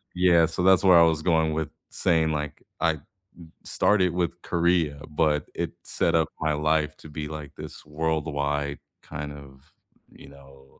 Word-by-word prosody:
Yeah, 90 Hz, -2 st, +5 dB
so 90 Hz, +2 st, -3 dB
that's 95 Hz, 0 st, +5 dB
where 90 Hz, -3 st, +7 dB
I -, -, +7 dB
was 80 Hz, -1 st, +2 dB
going 80 Hz, -3 st, +2 dB
with 80 Hz, -1 st, -2 dB, 0.2 s
saying, 80 Hz, -3 st, +1 dB
like, 75 Hz, -1 st, -4 dB, 0.2 s
I 80 Hz, -3 st, +1 dB, 0.6 s
started 95 Hz, -4 st, +2 dB
with 85 Hz, 0 st, -2 dB
Korea, 85 Hz, -4 st, +1 dB
but 75 Hz, -1 st, 0 dB
it -, -, -3 dB
set -, -, 0 dB
up 80 Hz, -1 st, +2 dB
my 80 Hz, -1 st, +1 dB
life 75 Hz, 0 st, 0 dB
to 80 Hz, -, -12 dB
be 75 Hz, 0 st, -5 dB
like 75 Hz, -2 st, -8 dB
this -, -, -10 dB
worldwide 75 Hz, -2 st, -2 dB, 0.2 s
kind 75 Hz, 0 st, -6 dB
of, 70 Hz, 0 st, -15 dB, 0.4 s
you -, -, -14 dB
know, 70 Hz, -1 st, -18 dB
80 Hz, 160 wpm, -25 LUFS, 75-85 Hz, 0.6 s, where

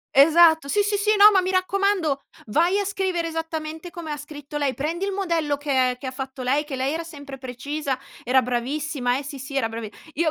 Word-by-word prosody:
Esatto. 320 Hz, +2 st, +6 dB
Sì, 410 Hz, +9 st, +2 dB
sì, 410 Hz, 0 st, 0 dB
sì. 420 Hz, +1 st, +2 dB
“No, 415 Hz, +1 st, +9 dB
ma 390 Hz, -, +4 dB
mi 370 Hz, +1 st, -1 dB
raccomando, 370 Hz, -6 st, +1 dB, 0.2 s
vai 340 Hz, -, +2 dB
a -, -, +1 dB
scrivere 375 Hz, -4 st, -1 dB
esattamente 320 Hz, +1 st, -5 dB
come 330 Hz, -3 st, -7 dB
ha 295 Hz, -, -3 dB
scritto 295 Hz, 0 st, -8 dB
lei. 280 Hz, -3 st, 0 dB
Prendi 330 Hz, +7 st, -2 dB
il 400 Hz, -, -2 dB
modello 335 Hz, -7 st, 0 dB
che 265 Hz, -3 st, +1 dB
che 270 Hz, -, -10 dB
ha 260 Hz, -, -3 dB
fatto 265 Hz, 0 st, -6 dB
lei, 275 Hz, +4 st, +1 dB
che 290 Hz, -3 st, -5 dB
lei 260 Hz, +1 st, 0 dB
era 330 Hz, +1 st, -3 dB
sempre 285 Hz, -4 st, -9 dB
precisa, 265 Hz, +2 st, -4 dB, 0.3 s
era 260 Hz, +2 st, +4 dB
bravissima. 250 Hz, +1 st, -1 dB
Eh 280 Hz, -, -5 dB
sì, 280 Hz, 0 st, -7 dB
sì, 275 Hz, +2 st, -7 dB
era 255 Hz, -5 st, +1 dB
bravi 225 Hz, -1 st, -5 dB, 0.3 s
"Io 330 Hz, -, +3 dB
300 Hz, 215 wpm, -24 LUFS, 270-340 Hz, 0.3 s, No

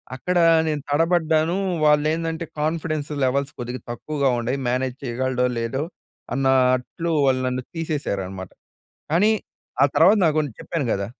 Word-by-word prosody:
అక్కడ 180 Hz, +8 st, -1 dB, 0.3 s
నేను 150 Hz, -2 st, -1 dB
తడబడ్డాను. 160 Hz, +1 st, +2 dB, 0.3 s
వాళ్ళేందంటే 160 Hz, +2 st, +1 dB
confidence 155 Hz, -1 st, -2 dB
levels 140 Hz, +2 st, 0 dB
కొద్దిగా 125 Hz, 0 st, -5 dB
తక్కువగా 140 Hz, +3 st, -1 dB
ఉండాయి. 120 Hz, +3 st, -1 dB
మేనేజ్ 130 Hz, +1 st, -1 dB
చేయగలడో 125 Hz, 0 st, -1 dB
లేదో, 115 Hz, +5 st, -2 dB, 0.5 s
అన్నట్లు 130 Hz, +4 st, +1 dB, 0.2 s
వాళ్ళు 130 Hz, -1 st, +2 dB
నన్ను 125 Hz, 0 st, -2 dB
తీసేశారనమాట. 100 Hz, -, -3 dB, 0.6 s
కానీ 195 Hz, +7 st, +4 dB, 0.5 s
ఆ -, -, +8 dB
తర్వాత 190 Hz, +7 st, +6 dB
నాకున్ 155 Hz, -1 st, +1 dB
చెప్పాను 165 Hz, -6 st, -3 dB
కదా! 100 Hz, 0 st, -1 dB
140 Hz, 120 wpm, -23 LUFS, 125-160 Hz, 0.6 s, ఆ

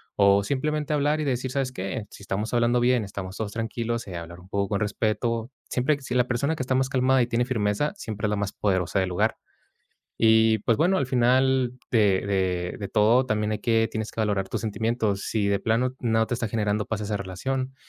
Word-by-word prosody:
o 100 Hz, 0 st, +4 dB
simplemente 150 Hz, +6 st, -1 dB
hablar 150 Hz, +1 st, +1 dB
y -, -, -2 dB
decir: 130 Hz, -1 st, -1 dB
"¿Sabes 135 Hz, -1 st, -1 dB
qué?, 105 Hz, +1 st, -4 dB
si -, -, -13 dB
estamos 105 Hz, +4 st, -3 dB
hablando 120 Hz, 0 st, +3 dB
bien, 120 Hz, -1 st, +3 dB
estamos 95 Hz, -1 st, -6 dB
todos 110 Hz, -2 st, -3 dB
tranquilos, 115 Hz, +1 st, -3 dB
eh, 90 Hz, -, -7 dB
hablar 85 Hz, +1 st, -8 dB
un 90 Hz, -, -15 dB
poco 100 Hz, 0 st, 0 dB
con 100 Hz, -, 0 dB
respeto". 115 Hz, +3 st, -1 dB, 0.2 s
Siempre 140 Hz, +4 st, +1 dB
si 130 Hz, -, -4 dB
la 125 Hz, 0 st, +3 dB
persona 140 Hz, +6 st, 0 dB
que 145 Hz, -, -5 dB
está 130 Hz, 0 st, 0 dB
más 130 Hz, 0 st, +1 dB
calmada 130 Hz, 0 st, +3 dB
y -, -, -2 dB
tiene 120 Hz, 0 st, +1 dB
firmeza, 110 Hz, +3 st, 0 dB
siempre 110 Hz, -, -3 dB
es -, -, -1 dB
la -, -, +1 dB
más 105 Hz, 0 st, -2 dB
poderosa 95 Hz, -2 st, 0 dB
del 95 Hz, -, 0 dB
lugar. 90 Hz, -, 0 dB, 0.8 s
Y 110 Hz, 0 st, +5 dB
pues 115 Hz, +2 st, +2 dB
bueno, 185 Hz, +4 st, +3 dB
al 135 Hz, -, 0 dB
final 130 Hz, 0 st, +3 dB, 0.2 s
de 110 Hz, -4 st, +4 dB, 0.2 s
de 90 Hz, -2 st, 0 dB
de 100 Hz, -, -5 dB
todo 115 Hz, +4 st, +4 dB
también 105 Hz, -2 st, 0 dB
hay 105 Hz, -, -2 dB
que 115 Hz, -1 st, +2 dB
tienes 110 Hz, -1 st, -4 dB
que -, -, -4 dB
valorar 100 Hz, -3 st, 0 dB
tus -, -, -3 dB
sentimientos, 110 Hz, -1 st, -1 dB
si 105 Hz, -3 st, -1 dB
de 100 Hz, -, +2 dB
plano 125 Hz, +3 st, +1 dB
no 115 Hz, -2 st, +2 dB
te 120 Hz, -, -2 dB
está 120 Hz, -1 st, -2 dB
generando 105 Hz, -1 st, 0 dB
paz 110 Hz, -1 st, -3 dB
esa 105 Hz, 0 st, -2 dB
relación, 130 Hz, +8 st, -3 dB
115 Hz, 220 wpm, -25 LUFS, 105-125 Hz, 0.8 s, Y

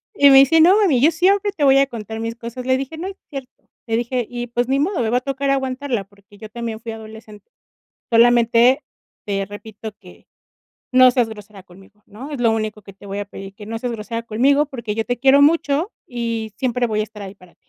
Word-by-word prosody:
Y 285 Hz, -5 st, +6 dB
me 270 Hz, -, +8 dB
dice: 300 Hz, +4 st, +5 dB
"No, 360 Hz, +4 st, +7 dB
mami, 345 Hz, -, +3 dB
yo 315 Hz, +5 st, +5 dB
siempre, 390 Hz, +5 st, +2 dB
te 330 Hz, -7 st, -4 dB
voy 270 Hz, -1 st, +6 dB
a 275 Hz, 0 st, +4 dB
contar 220 Hz, -2 st, -7 dB
mis 230 Hz, +1 st, -4 dB
cosas". 235 Hz, +1 st, -8 dB
Le 260 Hz, 0 st, +2 dB
dije: 275 Hz, +4 st, -6 dB
"No 360 Hz, +4 st, -5 dB
es 390 Hz, -, -7 dB
cierto", 270 Hz, -3 st, -7 dB, 0.4 s
le 225 Hz, 0 st, 0 dB
dije. 245 Hz, 0 st, -2 dB
Y 240 Hz, 0 st, -5 dB
pues, 240 Hz, +1 st, -1 dB
ni 270 Hz, +1 st, +1 dB
modo. 345 Hz, +3 st, 0 dB
Me 225 Hz, -, 0 dB
va 245 Hz, -, +2 dB
a 250 Hz, -, -1 dB
tocar 275 Hz, +1 st, -3 dB
aguantarla, 265 Hz, -4 st, -1 dB
porque 200 Hz, +1 st, -22 dB
yo 215 Hz, +1 st, -10 dB
también 230 Hz, -1 st, -5 dB
fui 230 Hz, 0 st, -7 dB
adolescente. 220 Hz, -, -12 dB, 0.6 s
"Solamente, 235 Hz, +2 st, +4 dB, 0.4 s
te 195 Hz, -1 st, -2 dB
repito, 215 Hz, +2 st, -9 dB
que -, -, -17 dB, 0.7 s
no 255 Hz, 0 st, +7 dB
seas 245 Hz, -2 st, +1 dB
grosera 210 Hz, -3 st, -11 dB
conmigo, 195 Hz, +3 st, -19 dB
¿no? 250 Hz, +8 st, -10 dB
Es 285 Hz, -4 st, -5 dB
lo 230 Hz, -2 st, +3 dB
único 215 Hz, -1 st, -3 dB
que 195 Hz, -, -13 dB
te 195 Hz, +1 st, -16 dB
voy 200 Hz, 0 st, -5 dB
a 205 Hz, -, -3 dB
pedir. 195 Hz, 0 st, -10 dB
Que 205 Hz, 0 st, -11 dB
no 225 Hz, +1 st, -4 dB
seas 245 Hz, +1 st, -3 dB
grosera 230 Hz, +1 st, -5 dB
conmigo, 270 Hz, +7 st, +2 dB
porque 235 Hz, -6 st, -5 dB
yo 225 Hz, +1 st, -2 dB
te 245 Hz, 0 st, -3 dB
quiero 270 Hz, +2 st, +5 dB
mucho, 310 Hz, -, +2 dB
y 230 Hz, -3 st, -4 dB
siempre 250 Hz, 0 st, 0 dB
voy 215 Hz, -1 st, -1 dB
a -, -, +2 dB
estar 210 Hz, -1 st, -9 dB
ahí, 195 Hz, 0 st, -8 dB
para 180 Hz, -3 st, -20 dB
ti. -, -, -49 dB
235 Hz, 235 wpm, -20 LUFS, 215-270 Hz, 0.7 s, me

